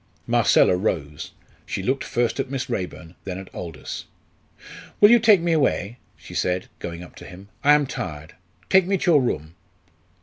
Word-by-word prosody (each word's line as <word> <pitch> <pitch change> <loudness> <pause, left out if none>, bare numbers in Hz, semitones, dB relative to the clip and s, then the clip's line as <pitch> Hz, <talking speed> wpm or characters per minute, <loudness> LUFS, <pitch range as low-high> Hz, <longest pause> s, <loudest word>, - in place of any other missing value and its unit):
Marcella - - +4
rose. 75 -7 -3 0.3
She - - -5
looked 130 +2 0
first 120 +2 -1
at 135 - -2
Miss 130 -2 -4
Raeburn 90 -5 -5
then 95 -2 -5
at 95 0 -10
Aldous. 80 -5 -7 0.9
"Will 205 +2 +8
you 240 - +7
take 215 -5 +5
me 170 0 0
away?" 130 - 0 0.2
she - - -13
said, 90 0 -1
going 85 0 -6
up 90 - -13
to - - -11
him; 95 +2 -12
"I 145 +1 +6
am 150 -1 +2
tired 80 - -6 0.3
take 190 -1 +4
me 195 0 +1
to 180 - +1
your 150 -4 +5
room." 80 - -3
110 Hz, 175 wpm, -23 LUFS, 90-150 Hz, 0.9 s, Will